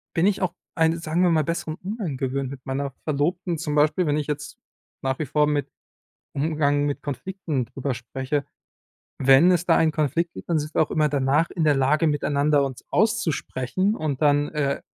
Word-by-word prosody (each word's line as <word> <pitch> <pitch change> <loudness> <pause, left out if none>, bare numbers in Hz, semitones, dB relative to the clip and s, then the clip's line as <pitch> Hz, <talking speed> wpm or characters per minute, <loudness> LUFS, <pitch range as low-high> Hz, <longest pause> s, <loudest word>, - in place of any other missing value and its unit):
bin 170 +2 +3
ich 205 -1 0
auch 180 -2 0 0.2
einen, 165 0 +2
sagen 165 +2 -1
wir 180 - +4
mal, 155 -2 +3
besseren 165 0 -3
Umgang 190 - -4
gewöhnt 135 0 -2
mit 135 -2 -9
meiner 135 +1 -2
Verlobten. 165 +4 -1
Zum 150 -2 -3
Beispiel, 155 +4 +3
wenn 145 +1 +1
ich 150 - -2
jetzt 150 0 -5 0.5
nach 135 +1 -1
wie 155 - -1
vor 150 +3 +2
mit 145 -1 -1 0.7
Umgang 145 -1 +1
mit 145 - -3
Konflikten 150 - -3
drüber 135 0 -3
spreche. 130 +4 -3 0.8
Wenn 135 +7 +6
es 175 0 +1
da 165 - +4
einen 160 -1 +3
Konflikt 165 +3 0
gibt, - - -10
dann 160 -2 +2
sind 150 +1 -5
wir - - +3
auch 155 - 0
immer 155 -1 +2
danach 145 +3 +2
in 165 - -1
der 150 -2 +4
Lage, 150 +4 +2
miteinander 145 -1 +2
uns 130 -2 -7
auszusprechen 190 - 0
und 150 -2 -3
dann, 145 0 +3
äh, 140 -2 -1
150 Hz, 195 wpm, -24 LUFS, 140-165 Hz, 0.8 s, Wenn